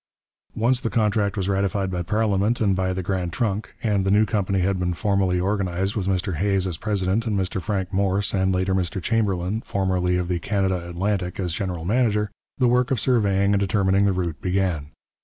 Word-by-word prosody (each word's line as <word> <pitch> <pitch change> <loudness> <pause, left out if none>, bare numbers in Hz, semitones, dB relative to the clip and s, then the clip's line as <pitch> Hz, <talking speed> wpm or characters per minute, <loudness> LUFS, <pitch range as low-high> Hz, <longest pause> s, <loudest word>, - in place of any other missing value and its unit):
Once 120 +3 +2
the 115 - -2
contract 105 -3 +1
was 95 -1 -1
ratified 100 0 0
by 90 -1 -2
parliament 105 +3 +1
and 100 -4 +2
by 95 0 0
the 95 0 -3
Grand 90 -1 -2
Trunk, 105 0 -2
and 105 -4 +1
the 95 - 0
new 105 +2 +4
company 100 -3 0
had 95 +1 0
been 90 -1 0
formally 95 -1 +1
organized 95 0 -1
with 100 -4 -2
Mr 95 -2 -1
Hays 95 +1 +1
as 90 -4 -3
president 105 +1 0
and 105 -2 0
Mr 95 0 -2
Frank 95 +2 -2
Morse, 100 +1 0
and 95 -1 +2
later 95 +1 0
Mr 95 0 -1
Chamberlin, 100 -1 0
formerly 90 -3 0
of 90 -1 -1
the 90 -1 -1
Canada 95 -2 -1
Atlantic, 90 +1 -2
as 90 -3 -1
general 90 -4 -3
manager, 105 -1 +1 0.3
the 125 - +3
work 125 +1 +2
of 130 -5 +1
surveying 100 -5 +2
and 100 - +3
determining 100 0 +2
the 100 - +3
route 85 -4 -3
began. 90 -5 0
95 Hz, 195 wpm, -23 LUFS, 90-105 Hz, 0.3 s, new